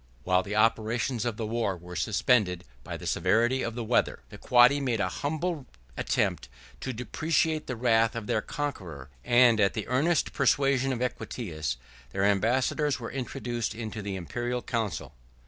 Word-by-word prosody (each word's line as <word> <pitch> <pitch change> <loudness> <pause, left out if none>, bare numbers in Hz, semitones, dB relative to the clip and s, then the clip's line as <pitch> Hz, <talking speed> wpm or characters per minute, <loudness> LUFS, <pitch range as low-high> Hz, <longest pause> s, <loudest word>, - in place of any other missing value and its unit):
While 90 +3 +3
the 100 +2 -5
operations 115 +2 +1
of 120 -2 -2
war 110 -3 -1
were 90 +1 -10
suspended 95 - +2 0.2
by - - -6
the - - -10
severity 120 +4 +2
of 115 - -3
the 120 - -3
weather, 115 +2 +1
the - - -11
Quadi 125 +3 +5
made 125 -5 0
an 105 - +1
humble 155 0 -3 0.3
attempt - - -1 0.3
to 130 - -3
deprecate 155 +5 0
the 130 - -3
wrath 115 -1 +2
of 115 -2 -4
their 110 - 0
conqueror; 85 - -5
and, 120 -2 +5
at 100 -1 +3
the 110 - -3
earnest 150 +6 +1
persuasion 135 -1 +2
of 125 -1 -1
Equitius, 80 - -3 0.4
their 95 - 0
ambassadors 125 +8 +1
were 115 - -6
introduced 120 -4 -3
into 110 -2 -5
the 100 -1 -4
Imperial 120 +7 -3
council. 115 -5 -3
120 Hz, 160 wpm, -28 LUFS, 105-130 Hz, 0.4 s, Quadi